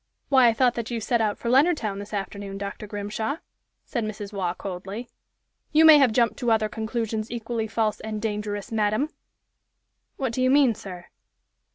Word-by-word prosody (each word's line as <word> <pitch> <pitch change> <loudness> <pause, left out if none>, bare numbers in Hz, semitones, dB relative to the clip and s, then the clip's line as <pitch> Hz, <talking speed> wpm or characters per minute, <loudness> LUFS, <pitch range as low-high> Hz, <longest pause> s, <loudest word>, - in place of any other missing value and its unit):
"Why, 260 -3 +6
I 230 - +4
thought 245 +1 +3
that 235 -1 -4
you 235 -2 -2
set 235 +2 +1
out 210 -2 0
for - - -6
Leonardtown 260 - +3
this 205 +1 -8
afternoon, 200 -1 -5
Dr. 200 +1 -6
Grimshaw!" 210 +6 -3 0.5
said 235 -4 -2
Mrs. 210 -1 -6
Waugh, 185 -3 -1
coldly. 195 +5 -6 0.6
"You 315 +1 +6
may 310 -2 +10
have 265 -4 +5
jumped 235 +1 +2
to 245 -3 0
other 220 -1 +3
conclusions 220 0 -3
equally 230 -1 -3
false 215 -1 0
and 215 -1 -4
dangerous, 210 -1 -3
madam!" 220 +6 +1 1.1
"What 260 -4 -2
do 255 - -1
you 255 - +3
mean, 270 -3 +5
sir?" 180 -4 -9
220 Hz, 175 wpm, -25 LUFS, 205-240 Hz, 1.1 s, may